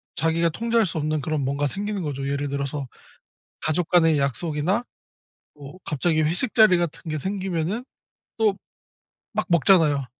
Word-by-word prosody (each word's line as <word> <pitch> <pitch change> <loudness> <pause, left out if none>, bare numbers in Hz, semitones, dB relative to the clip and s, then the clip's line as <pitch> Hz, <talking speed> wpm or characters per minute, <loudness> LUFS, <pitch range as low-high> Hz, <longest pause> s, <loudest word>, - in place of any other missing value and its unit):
자기가 165 +1 +1
통제할 230 +4 +1
수 165 -2 -4
없는 155 0 -1
그런 155 0 -1
뭔가 140 +2 -1
생기는 205 +4 -3
거죠. 140 -2 -3
예를 140 0 -2
들어서 140 -1 -3 0.7
가족 155 +2 -1
간의 165 -4 +4
약속이나 150 - 0 0.7
뭐 145 +4 -11
갑자기 155 +2 +1
회식 175 +10 +1
자리 215 -6 +6
같은 170 -2 -2
게 155 - -2
생기면은 190 - -2 0.6
또 210 -3 +2 0.8
막 - - +1
먹잖아요. 160 -5 +4
160 Hz, 305 characters per minute, -24 LUFS, 145-185 Hz, 0.8 s, 자리